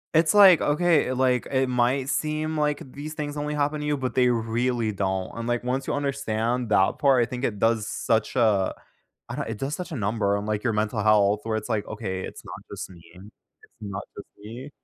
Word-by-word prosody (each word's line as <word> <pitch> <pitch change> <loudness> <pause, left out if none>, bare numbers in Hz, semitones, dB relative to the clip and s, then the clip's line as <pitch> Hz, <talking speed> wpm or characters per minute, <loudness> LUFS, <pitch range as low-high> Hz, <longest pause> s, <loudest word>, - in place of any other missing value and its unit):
It's 160 0 +4
like, 195 -5 +8
"Okay," 150 -3 +2
like, 125 -1 +1
"it 130 -1 +2
might 125 +2 +1
seem 155 +1 -1
like 150 -1 +1
these 150 +2 -6
things 150 -1 -5
only 150 0 -2
happen 150 +1 0
to - - -4
you, 150 0 +1
but 130 -3 -4
they 125 -1 +4
really 115 0 0
don't." 95 -2 -2
And, 115 - -4
like, 120 0 -1
once 130 +2 -2
you - - -2
understand 125 -4 -1
that 95 -2 +3
part, 135 -3 +4
I 115 - +1
think 125 0 -5
it 105 -6 -1
does 115 -1 +1
such 110 +1 -1
a 110 -6 +2 0.6
I - - -4
don't - - -3
it 115 - -4
does 135 +5 -3
such 180 -2 -6
a - - -3
number 105 -2 0
on, 100 - -4
like, 105 0 -2
your 115 - 0
mental 105 +1 -1
health 105 -1 +4
where 110 -1 -1
it's 110 - -5
like, 105 -2 -1
"Okay, 95 -4 -4
it's - - -8
not - - -8 0.2
just - - -7
me. 90 -2 -14
It's 95 +4 -14 0.5
not 100 -2 -5
just 100 - -9
me." 120 +7 -9
120 Hz, 220 wpm, -25 LUFS, 105-145 Hz, 0.6 s, like